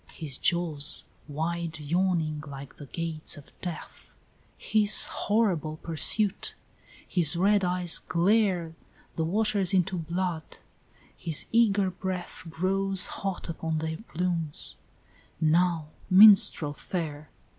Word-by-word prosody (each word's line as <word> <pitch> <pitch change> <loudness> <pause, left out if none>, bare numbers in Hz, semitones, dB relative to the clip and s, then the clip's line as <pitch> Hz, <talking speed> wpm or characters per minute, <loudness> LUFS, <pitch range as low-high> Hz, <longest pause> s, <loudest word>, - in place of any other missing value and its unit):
XXVIII. 160 - -10
His 135 -4 -6
jaws, 165 -4 +2 0.2
wide 160 +2 -4
yawning 160 -1 -1
like 140 -1 -10
the 145 - -11
gates 165 +1 -2
of 145 - -15
Death, 175 -3 -9 0.4
Hiss 215 -1 +3
horrible 180 -8 -1
pursuit 185 +6 +1 0.5
his 170 -3 +2
red 200 +3 +2
eyes 180 -1 +3
glare 180 -2 0 0.4
The 160 - -1
waters 200 0 +1
into 185 0 0
blood 170 0 -4 0.6
his 160 -3 -2
eager 205 -4 +2
breath 180 -1 -6
Grows 190 +3 +1 0.2
hot 195 -2 -4
upon 160 -1 -4
their 160 0 -4
plumes: 165 -3 -1 0.6
now, 165 0 +1 0.2
minstrel 190 -6 +6
fair! 150 -2 -6
170 Hz, 110 wpm, -27 LUFS, 160-190 Hz, 0.6 s, minstrel